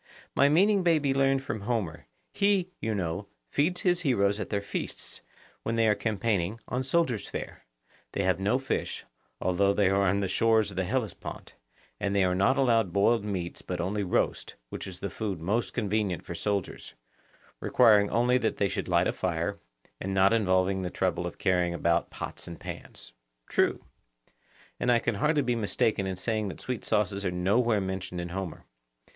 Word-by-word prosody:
My 140 - +4
meaning 195 +6 +4
may 170 -3 +4
be 140 -3 +1
learned 135 0 +2
from 110 -5 -4
Homer; 100 - -2 0.3
he, 200 -3 +2
you 110 -1 -1
know, 90 +1 -3 0.2
feeds 180 +5 +1
his 180 -1 +2
heroes 105 - +2
at 105 - -4
their 100 - 0
feasts, 100 - -5 0.4
when 115 - -2
they 115 -1 +3
are 105 - +5
campaigning, 105 -2 -1
on 125 - -1
soldiers' 130 -5 0
fare; - - -7 0.5
they 100 - 0
have 95 0 +2
no 105 +6 +2
fish, 135 0 -3 0.3
although 100 +2 +2
they 100 -2 +3
are 100 0 +3
on 100 +1 +2
the 100 - 0
shores 110 +2 +2
of - - -10
the 95 - +1
Hellespont, 115 +1 -4 0.5
and 100 0 -1
they 100 - +4
are 90 -1 +2
not 100 +8 +3
allowed 115 -8 +3
boiled 105 +4 +3
meats 95 -4 -4
but 90 -1 -4
only 95 +4 -1
roast, 90 -3 -1
which - - -6
is 90 -1 -9
the 100 - -2
food 100 -4 -3
most 100 +5 -1
convenient 105 -5 -1
for - - -5
soldiers, 100 +2 -3 0.6
requiring 105 -2 +5
only 125 +2 +3
that 110 - -1
they 100 - +2
should - - -3
light 90 0 +3
a - - 0
fire, 90 +2 -2 0.4
and 95 +1 -3
not 95 +2 +5
involving 95 -3 +2
the 90 - -2
trouble - - -1
of - - -8
carrying 90 -2 +1
about 85 0 +1
pots - - -7
and 85 -1 -8
pans. - - -9 0.3
True. - - +1 0.9
And 125 - +2
I 120 - +5
can 120 0 0
hardly 150 +8 +2
be 125 -2 +1
mistaken 105 -2 0
in 95 - -2
saying 110 +2 -1
that 95 - -7
sweet 125 -3 -4
sauces 100 -2 0
are 95 - +1
nowhere 105 +6 +2
mentioned 95 -2 -4
in 85 0 -4
Homer. 90 -2 -5
100 Hz, 185 wpm, -28 LUFS, 95-120 Hz, 0.9 s, are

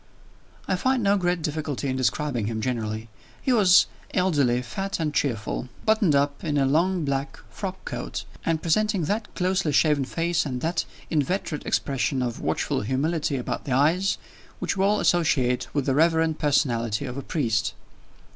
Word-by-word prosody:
I 185 - +1
find 260 +3 +1
no 200 0 +4
great 175 -3 0
difficulty 150 -2 -2
in 130 - -1
describing 130 -2 0
him, 110 -1 -2
generally. 110 -2 -2 0.3
He 260 - +1
was 195 -5 +6 0.3
elderly, 145 -10 +2
fat 195 +12 -4
and 155 -2 -1
cheerful; 125 -2 -1 0.2
buttoned 215 -8 +3
up 140 0 +1
in 150 -2 0
a 135 - +3
long 170 +4 +2
black 135 0 -2
frockcoat, 190 -2 -5 0.2
and 165 -1 0
presenting 205 +2 +2
that 205 +6 -1
closely 185 -3 +1
shaven 145 -1 +3
face 165 +4 0
and 130 -4 -3
that 165 0 0 0.3
inveterate 160 0 -1
expression 135 -1 0
of 120 -2 -3
watchful - - -1
humility 140 +6 0
about 125 - -4
the 130 - -1
eyes, 165 +9 +3 0.4
which - - -2
we 190 - +1
all 205 +2 +3
associate 130 -8 +2
with 145 -3 -1
the 135 - +2
reverend 160 +1 +2
personality 120 -5 +1
of 125 -2 -5
a 140 - -4
priest. 120 -7 0
150 Hz, 160 wpm, -25 LUFS, 130-180 Hz, 0.4 s, was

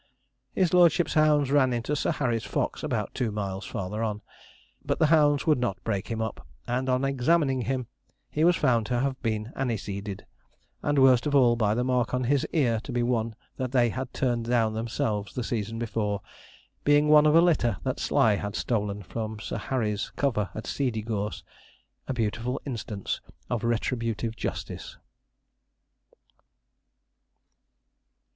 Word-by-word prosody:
His 180 -2 +2
lordship's 175 -1 +4
hounds 150 -3 +3
ran 135 -3 +4
into 120 +5 -1
Sir - - 0
Harry's 120 -7 -1
fox - - -2
about 120 -9 -2
two 120 -4 -1
miles 100 -1 -4
farther 100 +3 -4
on, 105 -2 -2 0.6
but - - -1
the - - +4
hounds 145 -2 +4
would 155 -5 +3
not 120 -6 -2
break 100 -3 -2
him 115 -1 -2
up; 110 - -6 0.2
and, 125 +2 -1
on 130 +1 +2
examining 135 0 +2
him, 130 +1 -2 0.5
he 155 - 0
was 175 +1 +5
found 120 -8 +2
to 120 -1 0
have 135 0 -1
been 110 0 -2
aniseeded; 105 -5 -3 0.6
and, 145 0 0
worst 130 0 +5
of 145 - +1
all, 125 -4 +5
by 110 -2 +1
the 125 - +1
mark 125 -1 +1
on 125 - 0
his 135 +2 +1
ear 125 -9 +2
to - - -8
be 120 0 0
one 115 -2 0 0.2
that 130 -1 -3
they 120 -2 +4
had 130 +1 -4
turned 120 -3 -1
down 115 -2 +2
themselves 110 -2 -2
the 125 - -2
season 115 -1 -3
before, 110 -3 -2 0.6
being 145 +1 +4
one 150 0 +7
of 150 - +4
a - - +8
litter 135 - +2
that - - -2
Sly 105 -3 +3
had 105 0 -4
stolen 105 -3 -1
from 110 +3 -5
Sir - - -4
Harry's 110 -6 -1
cover 110 -9 0
at 110 - -5
Seedeygorse 110 -5 -2 0.6
a - - -1
beautiful 115 +3 -1
instance 110 -6 -4 0.3
of 120 -2 -1
retributive 115 -1 -1
justice. - - -5
120 Hz, 160 wpm, -27 LUFS, 110-135 Hz, 0.6 s, a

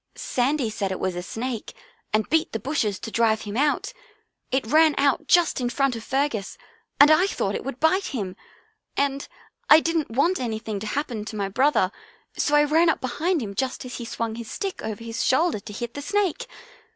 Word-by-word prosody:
Sandy 255 -1 0
said 200 -3 -2
it 190 - -3
was 185 -1 -1
a 175 - -3
snake 230 +4 -5 0.4
and 215 0 +1
beat 320 0 +1
the 225 - -1
bushes 220 -5 -1
to 225 - -7
drive 220 -1 +2
him 210 0 -6
out. 295 - +1 0.6
It 265 -1 0
ran 310 +5 +4
out 280 -1 +2
just 345 -6 +3
in 245 - 0
front 270 +1 +1
of 225 - -7
Fergus 265 -7 -1 0.4
and 290 +2 +8
I 355 +5 +5
thought 200 - -2
it - - -3
would 270 -1 -6
bite 370 +5 +2
him, 200 -9 -4 0.6
and 280 0 0 0.4
I 305 - +10
didn't 325 -2 -1
want 305 +11 +1
anything 220 -3 -3
to 215 - -5
happen 240 -4 -3
to 215 - -7
my 200 -2 -2
brother 255 -4 +2 0.4
so 295 - +1
I 295 - +6
ran 320 +3 +4
up - - +1
behind 320 +6 -1
him 200 -2 -5
just 260 +4 -3
as 250 - -6
he 240 - -5
swung 230 0 -3
his 230 0 -7
stick 390 -1 -4
over 220 0 -5
his 230 +2 -3
shoulder 315 -2 +2
to 200 - -10
hit 235 +3 -5
the 285 - -6
snake. 395 +1 -1
255 Hz, 205 wpm, -24 LUFS, 220-300 Hz, 0.6 s, I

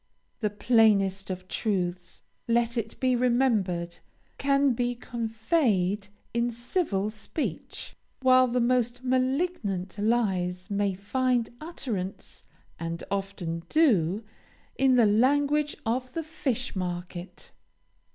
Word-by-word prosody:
The 215 - 0
plainest 205 -3 +3
of 185 0 -5
truths, 180 -4 -2 0.2
let 235 0 +2
it 225 -2 -3
be 255 -1 +2
remembered, 225 -9 +1 0.4
can 275 -1 +3
be 245 +1 -1
conveyed 220 - 0 0.3
in 235 +1 +1
civil 235 - -1
speech, 220 +8 -5 0.3
while 255 0 +6
the 250 +1 0
most 245 0 +1
malignant 255 - 0
lies 195 -4 0
may 200 -1 +1
find 245 +4 0
utterance, 230 - -5 0.4
and 165 0 -4
often 195 -4 -3
do, 215 - +3 0.5
in 265 -1 +4
the 240 -2 +6
language 285 +7 +3
of 250 +3 -1
the 330 - -2
fishmarket. 185 - -4
225 Hz, 105 wpm, -27 LUFS, 195-255 Hz, 0.5 s, while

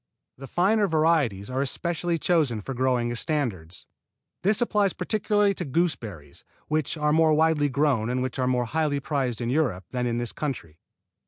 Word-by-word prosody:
The 135 - -8
finer 200 - +2
varieties 155 - +1
are 130 +1 -1
especially 170 +4 -1
chosen 155 -9 +1
for 135 - -5
growing 125 -2 0
as 120 - -1
standards. 95 - -2 0.6
This 205 +3 +2
applies 210 -5 +1
particularly 205 +1 +1
to 180 - -4
gooseberries, 120 - -3 0.3
which 155 0 -1
are 150 0 +1
more 160 -1 +4
widely 155 -2 +2
grown 135 -5 +1
and 125 +1 -1
which 130 +1 -4
are 130 - +1
more 125 -1 +1
highly 150 +2 0
prized 135 -4 -2
in 120 0 -1
Europe 130 - 0
than 125 -1 -1
in 120 0 -1
this 120 -1 -2
country. 100 - -5
140 Hz, 170 wpm, -25 LUFS, 120-165 Hz, 0.6 s, more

